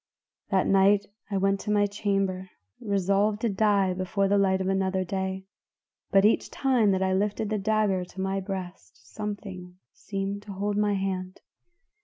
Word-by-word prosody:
"That 190 -1 +2
night 195 +1 +4 0.2
I 200 - -1
went 195 +1 +1
to 210 - -3
my 205 -1 +3
chamber 195 -2 -1 0.3
resolved 200 0 +1
to 235 - +1
die 200 -2 +2
before 190 +2 0
the 200 +1 +3
light 190 -1 +2
of 190 - -2
another 190 -1 0
day, 190 +1 -3 0.6
but 195 0 +4
each 215 - +2
time 255 -6 +2
that 190 -1 +2
I 190 0 +1
lifted 205 +2 -1
the 215 - 0
dagger 205 -2 +1
to 180 - -13
my 190 +1 -1
breast 185 - -7 0.2
something 195 -4 -6 0.2
seemed 195 0 -4
to 205 -1 -9
hold 205 +2 -2
my 205 0 +2
hand. 185 -1 -3
195 Hz, 165 wpm, -27 LUFS, 190-205 Hz, 0.6 s, night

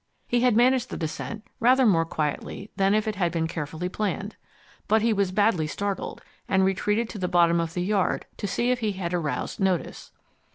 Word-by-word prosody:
He 240 - +2
had 245 -2 +3
managed 255 0 +3
the - - -5
descent 205 +7 -5
rather 255 +2 +5
more 165 -7 +4
quietly 155 +6 -4
than 195 +1 +3
if 215 0 +1
it 215 -3 -2
had 175 -3 +1
been 165 -1 0
carefully 160 +2 -4
planned. 200 +1 -3 0.5
But 220 0 +3
he 230 -1 +3
was 200 -3 +1
badly 195 -5 +2
startled, 200 +4 -4 0.3
and 190 -1 +3
retreated 210 +4 +1
to 210 - -7
the 180 - -1
bottom 170 -1 +4
of 165 -1 -3
the 180 - 0
yard 195 0 0
to 205 - -3
see 240 +6 0
if 250 - 0
he 215 -3 -1
had 180 -2 -4
aroused 170 +4 -2
notice. 190 -3 -1
195 Hz, 200 wpm, -26 LUFS, 170-220 Hz, 0.5 s, rather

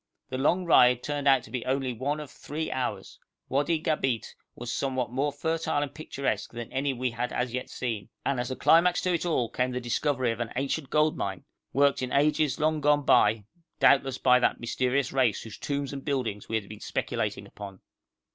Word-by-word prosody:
The 130 - -3
long 175 +6 +2
ride 125 -7 +5
turned 145 -1 -2
out 135 -3 +4
only 125 - -4
to 130 +1 -1
be - - -5
one 140 +6 -2
of 150 -3 -8
three 155 +2 -5
hours. 120 -7 -4 0.3
Wadi 145 +5 +1
Gabeit 135 -7 -1 0.2
was 120 0 -5
somewhat 130 -3 -1
more 140 +3 0
fertile 160 0 -1
and 145 - -6
picturesque 140 -3 -3
than 120 -1 -7
any 135 +1 0
we 130 -1 -2
had 120 +2 -3
as 125 -1 -2
yet 125 - -3
seen, 115 -5 -4 0.2
and 135 -2 0
as 120 - -2
a 130 - -3
climax 175 +5 +4
to 185 - +1
it 170 +1 -1
all 130 -8 +1
came 125 +3 -1
the 125 0 -3
discovery 125 +1 0
of 115 - -5
an 120 -1 -3
ancient 135 +2 -2
gold 155 0 +2
mine, 95 -2 -3 0.3
worked 140 0 +3
in 130 -1 -3
ages 150 +1 +2
long 155 0 +1
gone 145 0 +3
by 105 0 +4 0.3
doubtless 135 -2 +4
by 125 -1 +5
that - - +1
mysterious 125 +2 0
race 125 -6 +2
whose 110 -2 -10
tombs 140 -1 -3
and 135 -1 -6
buildings 125 -8 -2
we 110 - -1
had 105 -3 -2
been 105 0 -10
speculating 110 -3 -2
upon. 100 -1 -10
130 Hz, 205 wpm, -28 LUFS, 120-145 Hz, 0.3 s, ride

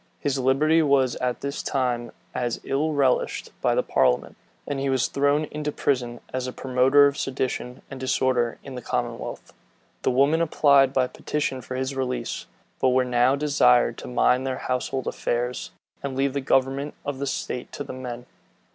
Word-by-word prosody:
His 140 -1 -1
liberty 150 +5 +3
was 135 -4 +3
at 125 -1 -2
this 140 +1 -3
time 120 -4 -1 0.2
as 120 -2 -2
ill 150 +4 0
relished 135 -3 +1
by - - +2
the - - +2
parliament; 60 - +1 0.3
and 140 -1 -3
he 135 0 -1
was 130 -2 +2
thrown 145 +2 +2
into 150 0 -3
prison, 125 -5 -1
as 130 0 -2
a - - -3
promoter 130 +3 +4
of 140 +1 +1
sedition 130 -1 -3
and 135 - -7
disorder 130 -2 +1
in 135 - -8
the 125 - -6
commonwealth. - - -4 0.5
The - - +1
women 140 +6 +3
applied 140 -4 +4
by 130 -2 +2
petition 135 0 -3
for 130 +2 -6
his 130 +1 -2
release; 125 -3 -3 0.3
but 130 - +3
were 130 0 +3
now 125 +2 +3
desired 140 -4 +3
to - - -8
mind 125 +1 +2
their 130 - -2
household 130 +1 -2
affairs, 120 +1 -2 0.3
and 140 -1 -4
leave 135 0 +1
the 140 - -1
government 135 +2 +1
of 145 -2 -3
the 140 - -2
state 125 -2 -4
to 145 - -4
the 140 - -7
men. 125 -1 -6
130 Hz, 175 wpm, -25 LUFS, 125-140 Hz, 0.5 s, promoter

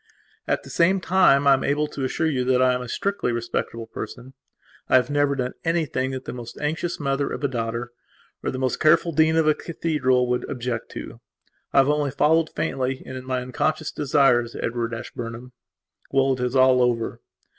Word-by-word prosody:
At - - 0
the - - -11
same 185 +3 +3
time 180 -6 +4
I 140 - +7
am 135 - +1
able 145 +2 +1
to 140 - -5
assure 130 +5 -1
you 135 -5 +1
that 130 0 +3
I 130 0 +4
am 125 - -2
a 125 - -7
strictly 200 -7 -1
respectable 115 -1 -3
person. 120 +4 -8 0.6
I - - +4
have 125 +1 +3
never 145 -1 +2
done 125 -1 -2
anything 160 -6 0
that 130 -1 -6
the - - -5
most 120 -2 -8
anxious 160 +3 -2
mother 140 -1 -1
of - - -5
a - - +3
daughter 120 -1 -3 0.5
or - - -2
the 130 - -4
most 130 -1 -1
careful 165 +2 +4
dean 160 +1 +3
of 160 -1 +3
a 155 - +6
cathedral 145 -7 0
would 125 0 -1
object 120 -3 -4
to. - - -8 0.5
I - - -1
have 135 +1 +6
only 150 -1 +1
followed, 160 +4 +2
faintly, 130 0 -2
and 130 - -7
in 130 0 -7
my 130 -1 -1
unconscious 130 +5 -1
desires, 135 -5 +2
Edward 115 0 -2
Ashburnham. 120 +2 -7 0.6
Well, 135 0 +2
it 130 - -5
is 125 +1 -1
all 130 -1 +5
over. 120 -2 0
130 Hz, 200 wpm, -24 LUFS, 125-150 Hz, 0.6 s, I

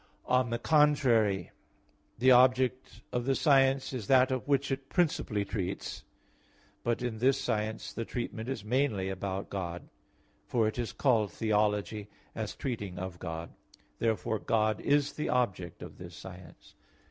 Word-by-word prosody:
On 125 -1 +2
the 120 - -1
contrary, 120 - +3 0.7
The 130 +2 +5
object 130 0 +3
of 120 -1 -1
the 135 0 +2
science 135 -3 +3
is 115 -6 -4
that 130 0 +5
of 130 -4 -2
which 140 -1 +1
it 135 0 -3
principally 140 - +1
treats. 95 -2 -4 0.8
But 120 +1 0
in 115 -3 -3
this 135 +3 +3
science, 110 0 -2
the 115 - -3
treatment 115 0 -4
is 135 -6 -4
mainly 110 -5 +1
about 95 0 -4
God; 90 -3 -5 0.6
for 115 -3 +2
it 110 - -3
is 120 - -2
called 115 -7 +2
theology, 105 -1 0 0.3
as 110 -3 -4
treating 105 -8 -4
of 90 -1 -6
God. 80 +1 -5 0.5
Therefore 110 -1 0
God 110 -1 +1
is 145 0 +2
the 150 - -3
object 95 -9 -1
of - - -11
this 90 -1 -9
science. 90 -3 -12
115 Hz, 145 wpm, -30 LUFS, 100-130 Hz, 0.8 s, The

